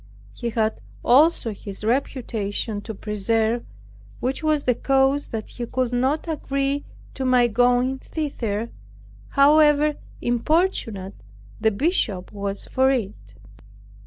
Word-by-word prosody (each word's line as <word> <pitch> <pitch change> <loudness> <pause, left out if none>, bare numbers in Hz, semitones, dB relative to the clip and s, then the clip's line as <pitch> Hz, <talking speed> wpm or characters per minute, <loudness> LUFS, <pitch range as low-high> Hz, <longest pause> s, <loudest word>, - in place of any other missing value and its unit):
He 235 - -4
had 220 -1 -1 0.2
also 270 -3 +4
his 200 0 -9
reputation 225 -4 -2
to 220 +1 -7
preserve, 220 +3 0 0.6
which 260 +2 -2
was 310 -2 +1
the 250 - +3
cause 270 +3 +2
that 220 -2 -5
he 240 -1 -5
could 250 0 -1
not 265 +7 0
agree 275 -2 -1 0.3
to 265 - -4
my 250 -1 +4
going 245 +3 +2
thither, 235 -9 -3 0.6
however 295 +1 +5 0.3
importunate 240 - 0 0.5
the 220 - +3
Bishop 215 - -1
was 200 -1 -4
for 265 0 +2
it. 195 - -3
245 Hz, 115 wpm, -23 LUFS, 220-275 Hz, 0.6 s, however